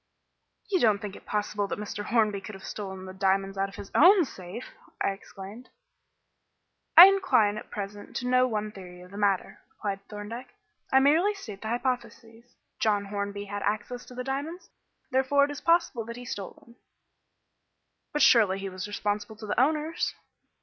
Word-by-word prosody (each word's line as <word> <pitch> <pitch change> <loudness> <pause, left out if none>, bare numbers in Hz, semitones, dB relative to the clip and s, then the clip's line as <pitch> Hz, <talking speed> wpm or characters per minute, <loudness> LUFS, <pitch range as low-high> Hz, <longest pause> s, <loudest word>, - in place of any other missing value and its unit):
"You 375 - +3
don't 215 -6 +4
think 200 -1 -7
it - - -14
possible 205 -1 -1
that - - -4
Mr. 205 0 -5
Hornby 215 -4 +1
could 210 0 -8
have 190 - -12
stolen 190 -2 -6
the 185 - -8
diamonds 195 0 +1
out 195 0 -1
of 195 - -13
his 195 - -9
own 360 +2 +7
safe?" 190 0 -9 0.3
I - - +1
exclaimed. 195 +4 -10 1.3
"I 345 - +15
incline 370 - +4
at 215 - -8
present 205 0 -7
to 245 - -3
no 255 0 +4
one 215 -2 -2
theory 180 -3 -11
of 180 +1 -14
the 200 - -9
matter," 200 -2 0
replied 200 -2 -4
Thorndyke. 215 +5 -8 0.4
"I 265 - +6
merely 325 +10 +4
state 215 - -9
the 220 - -5
hypotheses. 240 -1 -4 0.2
John 205 -2 +1
Hornby 200 0 -4
had 205 0 -5
access 215 +5 -2
to 250 - -11
the 250 - -4
diamonds, 285 +7 -5 0.4
therefore 265 +2 +3
it 290 - -5
is 290 - -7
possible 335 -8 +2
that 235 +1 -7
he 245 - -9
stole 200 -5 -5
them." 235 0 -20 1.3
"But 295 -1 +2
surely 210 -7 +5
he 195 0 -5
was 185 +1 -6
responsible 205 +1 -3
to 215 - -9
the 210 - -1
owners." 305 +4 +1
215 Hz, 175 wpm, -28 LUFS, 200-255 Hz, 1.3 s, I